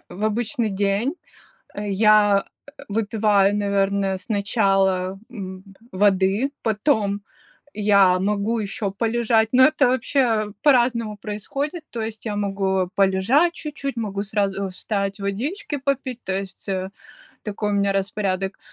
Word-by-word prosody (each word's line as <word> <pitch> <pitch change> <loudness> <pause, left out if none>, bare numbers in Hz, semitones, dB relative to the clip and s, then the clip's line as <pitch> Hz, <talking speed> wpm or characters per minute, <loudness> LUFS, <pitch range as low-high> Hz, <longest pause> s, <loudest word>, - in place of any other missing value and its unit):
в 205 +4 -5
обычный 225 +1 -1
день, 200 - 0 0.6
э, 205 0 -4
я, 205 0 +4 0.2
э, - - -12 0.2
выпиваю, 205 -2 +2
наверное, 200 -1 0
сначала, 195 -3 +1
м, 190 -5 -7 0.3
п 185 - -10
воды, 200 +5 +3
потом 215 -2 +1 0.6
я 200 -3 +4
могу 210 +3 0
ещё 205 0 -2
полежать, 225 +1 +1
но 260 +1 +6
это 295 -3 +3
вообще 240 -5 +1
по-разному 240 -6 +2
происходит. 275 - -4
То 235 - -4
есть 220 0 -6
я 210 -2 -2
могу 195 -2 0
полежать 200 - +3
чуть-чуть, 285 -5 -5
могу 205 -3 -2
сразу 200 -1 -1
встать, 200 +1 -3
водички 275 - -3
попить, 270 -3 -2
то 190 - -3
есть, 195 +1 -9
э, 190 -1 -2 0.6
такой 210 0 -2
у - - -1
меня 200 0 +2
распорядок. 195 -1 -2
205 Hz, 130 wpm, -22 LUFS, 195-230 Hz, 0.6 s, но